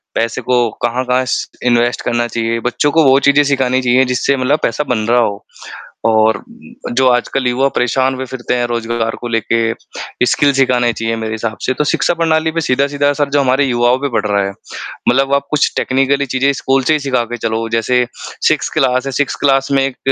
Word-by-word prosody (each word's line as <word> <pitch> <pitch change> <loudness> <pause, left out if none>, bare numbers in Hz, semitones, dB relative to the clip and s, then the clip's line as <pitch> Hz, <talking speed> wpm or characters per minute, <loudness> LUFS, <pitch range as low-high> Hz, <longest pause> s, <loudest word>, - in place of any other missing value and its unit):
पैसे 115 +2 -1
को 120 -1 +1
कहाँ-कहाँ 125 +1 0
श - - -1 0.2
इन्वेस्ट 120 0 +2
करना 120 0 0
चाहिए, 115 0 -2
बच्चों 125 +5 0
को 160 +1 +3
वो 135 0 +5
चीज़ें 140 +1 +4
सिखानी 130 -2 +1
चाहिए 125 +1 +3
जिससे 125 +2 0
मतलब 135 +4 +1
पैसा 115 +6 0
बन 125 - +1
रहा 120 +1 +3
हो। 100 -3 -2 0.6
और 110 0 +3 0.5
जो 130 +1 +3
आजकल 125 +1 0
युवा 125 +2 +1
परेशान 130 +2 +1
हुए 130 0 -5
फ़िरते 125 -1 -4
हैं 120 -1 0
रोज़गार 115 -1 -2
को 120 - -4
लेके, 115 0 0 0.5
स्किल्स 140 +3 +2
सिखाने 125 -3 +2
चाहिए 115 0 -2
मेरे 110 -1 -4
हिसाब 110 0 -4
से, 130 - 0
तो 150 - -1
शिक्षा 165 +3 +1
प्रणाली 160 -1 +1
पर 165 - -2
सीधा-सीधा 140 +1 +1
जो 145 0 +1
हमारे 135 +2 +2
युवाओं 125 +2 +1
पढ़ 110 -2 0
रहा 100 -1 +1
है। 100 - -3 0.6
मतलब 135 +2 +2
आप 140 0 0
कुछ 150 - +1
टेक्निकली 135 +2 +1
चीज़ें 135 +2 +1
स्कूल 135 0 0
से 155 - +2
ही 155 - +2
सिखा 130 -4 0
के - - -2
चलो। 115 0 -2
जैसे 115 +2 +1 0.4
6th - - 0
क्लास 130 0 +1
है, 135 - -3
6th 145 +1 -2
क्लास 135 -1 +2
में 135 -1 +3
1 135 -2 -3
125 Hz, 195 wpm, -15 LUFS, 120-135 Hz, 0.6 s, वो